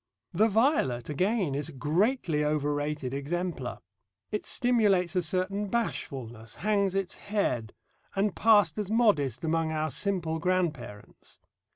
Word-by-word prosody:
The 210 +6 +4
violet, 205 - +1
again, 185 +1 0
is 145 +2 -2
a - - -10
greatly 160 - +1
overrated 145 -2 -1
exemplar. 145 -1 -3 0.5
It 210 - -2
stimulates 205 -8 +2
a 180 - +3
certain 185 +4 -1
bashfulness, 120 - -4
hangs 200 -2 0
its 195 -1 -2
head, 195 - -1 0.4
and 195 +1 +1
passed 205 -5 +4
as 205 -2 -3
modest 180 - +2
among 165 0 0
our 155 -1 -1
simple 170 - -1
grandparents. 160 - -3
175 Hz, 125 wpm, -28 LUFS, 145-205 Hz, 0.5 s, The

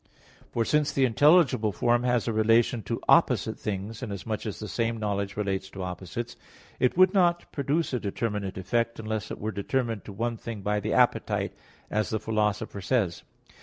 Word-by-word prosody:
For 115 - 0
since 150 +2 +2
the 135 - +3
intelligible 130 -3 +4
form 120 +5 +2
has 125 -2 +1
a 115 - 0
relation 115 +2 +3
to - - -1
opposite - - +3
things 105 +2 -4
(inasmuch 110 -1 -4
as 105 - -4
the 105 - -6
same 115 +4 -1
knowledge 100 -2 -2
relates 95 -2 -2
to 95 -1 -6
opposites), 95 +6 -5 0.4
it 125 +5 +2
would 185 +1 +6
not 175 -3 +2
produce 145 +2 -1
a 125 - +1
determinate 105 -2 -3
effect 115 +5 -1
unless 110 -1 -3
it - - -5
were 110 +1 -3
determined 115 +1 -2
to - - -8
one 115 +3 -2
thing 110 -3 -7
by 105 +1 +1
the 105 +1 -2
appetite, 125 -1 +2 0.4
as 110 0 0
the 110 - -1
Philosopher 105 -2 -1
says 95 -4 0
(Metaph. - - -30
110 Hz, 180 wpm, -27 LUFS, 100-120 Hz, 0.4 s, would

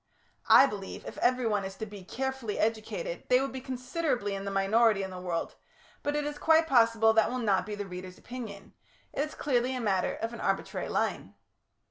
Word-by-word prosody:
(I - - +9
believe 200 -7 -6
if - - -7
everyone 240 -5 +2
is 190 0 -6
to 220 - -5
be 205 -2 -10
carefully 265 0 -3
educated 225 - -2
they 250 - +6
would 270 +1 -2
be 260 - -6
considerably 255 -3 -2
in 195 0 -4
the - - -2
minority 195 +2 +3
in 190 - -5
the 185 - -7
world, 170 -2 -3 0.4
but 290 0 -1
it 295 -1 0
is 295 0 -4
quite 320 0 +5
possible 230 -5 +4
that 220 -1 +4
will 255 - -2
not 205 -5 +1
be 210 - -4
the 205 0 -4
reader's 180 0 -8
opinion. 220 -6 -8 0.4
It - - -5
is 305 - -6
clearly 255 -2 0
a - - -2
matter 195 -5 0
of 225 +1 -4
an - - -7
arbitrary - - -1
line.) - - -1
225 Hz, 200 wpm, -29 LUFS, 200-260 Hz, 0.4 s, I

